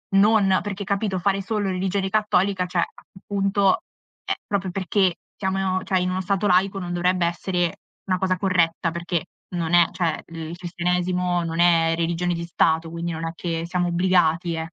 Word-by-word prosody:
Non 200 -2 +5
perché, 200 -1 -4
capito, 200 -1 -1
fare 195 +2 +1
solo 210 -1 -2
religione 190 +1 -1
cattolica, 200 -3 +1
cioè 175 -1 0 0.4
appunto, 195 - +1 0.5
ehm, - - 0
proprio 195 -2 -1
perché 190 -1 +1 0.2
siamo 190 -1 -1
in 195 - 0
o 185 0 0
cioè 185 -1 +1
in 180 0 0
uno 185 +1 -1
stato 200 +2 0
laico 190 +2 +3
non 175 -1 -4
dovrebbe 180 0 +1
essere 175 0 -1 0.3
una 185 -1 +1
cosa 185 0 0
corretta, 175 -3 +1
perché 170 0 -2 0.3
non 170 -1 -2
è 175 -1 +6
cioè, 170 -3 -1
il 165 0 -7
cristianesimo 180 0 -1
non 165 0 -3
è 165 -1 +4
religione 170 +1 0
di 170 0 -4
Stato, 165 -1 +1
quindi 170 0 -3
non 165 0 -4
è - - -3
che 165 -1 -3
siamo 180 0 0
obbligati, 175 -1 +2
eh. 160 0 -2
180 Hz, 180 wpm, -23 LUFS, 170-195 Hz, 0.5 s, è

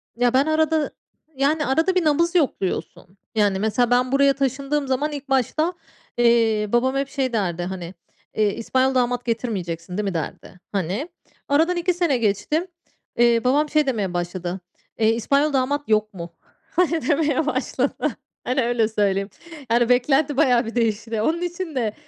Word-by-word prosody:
Ya, 245 +1 +2
ben 265 +2 +4
arada, 315 0 +1 0.4
yani, 290 +3 +1
arada 320 +8 +1
bir 365 - +2
nabız 335 +4 +2
yokluyorsun. 195 - -2 0.2
Yani, 205 -3 +2
mesela 225 +3 +1
ben 250 +1 +2
buraya 275 0 +4
taşındığım 275 +1 -1
zaman 285 +4 0
ilk 285 -1 -7
başta, 290 +6 +1 0.4
eee, 230 -3 +3
babam 260 +3 +2
hep 275 0 -1
şey 270 -3 -2
derdi, 180 -6 -1
hani, 180 -1 -6 0.4
eee, 210 -2 +2
"İspanyol 260 +3 0
damat 245 -1 0
getirmeyeceksin, 190 -7 -3
değil 210 - -1
mi?" 195 -2 -2
derdi. 165 +2 -6
Hani, 200 - -2 0.4
aradan 325 +5 +2
2 345 +1 +1
sene 340 -6 +1
geçti, 235 - 0 0.5
eee, 235 -1 +4
babam 290 +4 +2
şey 305 0 +2
demeye 210 -9 -1
başladı, 175 +1 -3 0.4
eee, 220 - +4
"İspanyol 280 +6 +1
damat 280 +1 0
yok 215 0 +1
mu?" 170 -2 -8 0.4
hani, 330 -5 +1
demeye 300 0 +2
başladı. 305 - -1 0.3
Hani, 255 +2 0
öyle 235 -2 +1
söyleyeyim. 200 -2 0 0.4
Yani, 235 0 +3
beklenti 270 +3 +2
bayağı 250 -5 +3
bir 225 - -7
değişti. 225 -1 -1
Onun 325 +9 0
için 350 -2 -4
de, 225 -5 -1
250 Hz, 160 wpm, -22 LUFS, 215-290 Hz, 0.5 s, ben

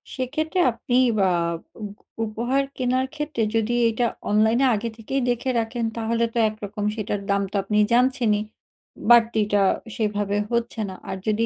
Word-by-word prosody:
সেক্ষেত্রে 310 +7 -2
আপনি 245 +2 -1 0.2
বা 190 -1 +4 0.5
উগ 205 - -5 0.3
উপহার 240 +5 0
কেনার 255 +1 +1
ক্ষেত্রে 300 -4 -3
যদি 225 +1 +1
এটা 235 +2 0 0.3
অনলাইনে 220 +5 +3
আগে 225 +3 -3
থেকেই 265 +5 -2
দেখে 245 +2 -1
রাখেন 230 +1 -2
তাহলে 230 +1 0
তো - - -4
একরকম 210 -1 -6
সেটার 210 -2 -3
দাম 200 0 +2
তো - - -7
আপনি 210 +2 -1 0.2
জানছেনই 245 -4 +3 0.7
বাড়তিটা 220 -3 +4 0.3
সেভাবে 205 -2 -1
হচ্ছে 235 -1 -1
না 190 - -7
আর 190 - -3
যদি 215 +1 +2
230 Hz, 145 wpm, -23 LUFS, 210-245 Hz, 0.7 s, বা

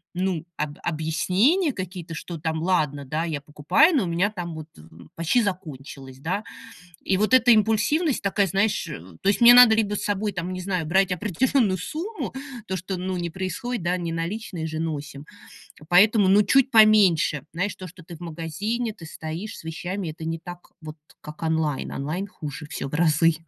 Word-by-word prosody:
ну, 180 -3 -1
об 150 -1 -3
объяснения 185 - +1
какие-то, 180 -5 -7
что 170 +1 -7
там 160 0 -2
ладно, 150 -6 0
да, 155 +5 -2
я 155 -4 -3
покупаю, 150 - +3
но 250 -9 +2
у - - -4
меня 175 +5 +1
там 175 -5 -6
вот, 155 -1 -7
м, 80 +1 -16
почти 170 +9 +2
закончилось, 145 -8 -6
да. 180 +9 -2 0.6
И 190 - 0
вот 210 +5 0
эта 245 -1 +6
импульсивность 225 - +2
такая, 200 0 +1
знаешь, 200 +4 0
э, - - -6 0.2
то - - +1
есть 200 - +2
мне 240 0 +9
надо 245 -3 +8
либо 210 -2 0
с - - -3
собой 205 +1 -1
там, 180 0 -4
не 185 - -5
знаю, 185 -2 -2
брать 190 +4 +2
определённую 205 - +1
сумму, 330 - -5 0.3
то, 190 - -2
что, 185 +2 -4
ну, 185 +1 -3
не 175 -1 -3
происходит, 190 +6 -4
да, 175 +1 +1
не 170 -2 -4
наличные 170 0 -4
же 160 0 -4
носим. 145 -3 -5 0.6
Поэтому, 200 +3 +5
ну, 200 +2 +6
чуть 270 +2 +3
поменьше, 210 - +5
знаешь, 185 +5 -2
то, 185 - -9
что 165 -1 -15
ты 170 0 -10
в - - -21
магазине, 175 +8 -3
ты 165 - -11
стоишь 165 +7 -7
с - - -12
вещами, 175 +3 -4
это 160 +1 -9
не 165 +1 -3
так 175 +2 -11
вот, 155 -1 -9 0.2
как 150 +1 -11
онлайн. 160 -3 -1
Онлайн 160 +8 -4
хуже 150 -5 -8
всё - - -4
в 135 - -7
разы. 165 +1 +3
180 Hz, 190 wpm, -24 LUFS, 160-210 Hz, 0.6 s, мне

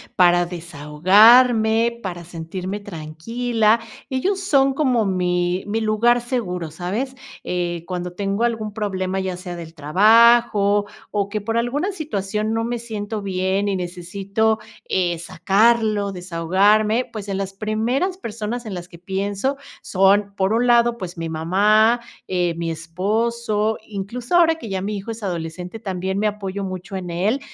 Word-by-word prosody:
para 175 -1 +5
desahogarme, 215 - +4
para 175 -4 -5
sentirme 180 +4 -6
tranquila. 215 +6 0 0.3
Ellos 370 +9 0
son 275 -7 +3
como 255 -6 +1
mi 180 -1 0
mi 220 +2 -1
lugar 225 +3 +3
seguro, 180 - -3
¿sabes? 205 - -3 0.3
Eh, 175 -2 -2
cuando 180 -1 -4
tengo 200 +3 -1
algún 225 -3 -1
problema, 190 -3 -2
ya 185 -1 -3
sea 180 -1 -7
del 165 -1 -9
trabajo, 205 +5 +4 0.3
o 200 -1 -1
que, 210 0 -3
por 225 +3 -2
alguna 280 +11 0
situación, 215 - -3
no 225 0 0
me 240 +1 -2
siento 220 -2 -5
bien 190 +1 -1
y 200 - 0
necesito, 195 +5 -1 0.3
eh, 175 -2 +1
sacarlo, 205 +3 +2
desahogarme, 195 +6 +2
pues, 215 -3 -7
en 195 - -1
las 195 0 -4
primeras 225 - -1
personas 230 - -5
en 215 - -5
las 175 -1 -6
que 170 - -14
pienso 200 +8 -2 0.2
son, 200 +1 +2
por 195 +2 +1
un 240 +2 +2
lado, 235 0 +4
pues, 185 -4 -7
mi 165 0 -4
mamá, 210 +8 +3 0.3
eh, 180 -2 0
mi 170 -1 -2
esposo, 215 +6 -1
incluso 220 - -4
ahora 330 -2 +5
que 275 -9 -9
ya 190 -1 -2
mi 205 +2 -3
hijo 200 +3 -6
es 225 0 -8
adolescente, 180 +2 -5
también 190 -2 -3
me 215 - +2
apoyo 200 -1 -4
mucho 185 0 -6
en 185 -2 -5
él, 195 +10 0
200 Hz, 150 wpm, -21 LUFS, 180-230 Hz, 0.3 s, para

